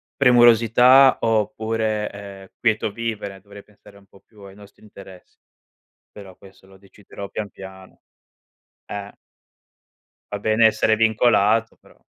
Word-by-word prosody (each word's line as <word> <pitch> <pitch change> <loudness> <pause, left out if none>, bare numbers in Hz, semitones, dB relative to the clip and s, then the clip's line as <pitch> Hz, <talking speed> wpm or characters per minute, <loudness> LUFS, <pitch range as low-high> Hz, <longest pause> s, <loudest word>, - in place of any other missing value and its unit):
premurosità, 125 +1 +5
oppure, 110 -1 -2
ehm, 100 -1 -12
quieto 110 -2 -1
vivere, 105 -3 -6
dovrei 100 +1 -15
pensare 105 -1 -21
un 100 - -21
po' 100 - -22
più 105 -2 -22
ai 100 -1 -13
nostri 100 0 -19
interessi. 95 -3 -16 0.7
Però 95 -3 -14
questo 95 -1 -19
lo 95 0 -19
deciderò 100 0 -13
pian 105 -2 -6
piano. 95 -1 -14 0.9
Eh 100 0 -8 1.2
va 105 - -4
bene 110 +2 +2
essere 110 0 +1
vincolato 110 0 +1
però - - -25
105 Hz, 125 wpm, -20 LUFS, 100-110 Hz, 1.2 s, premurosità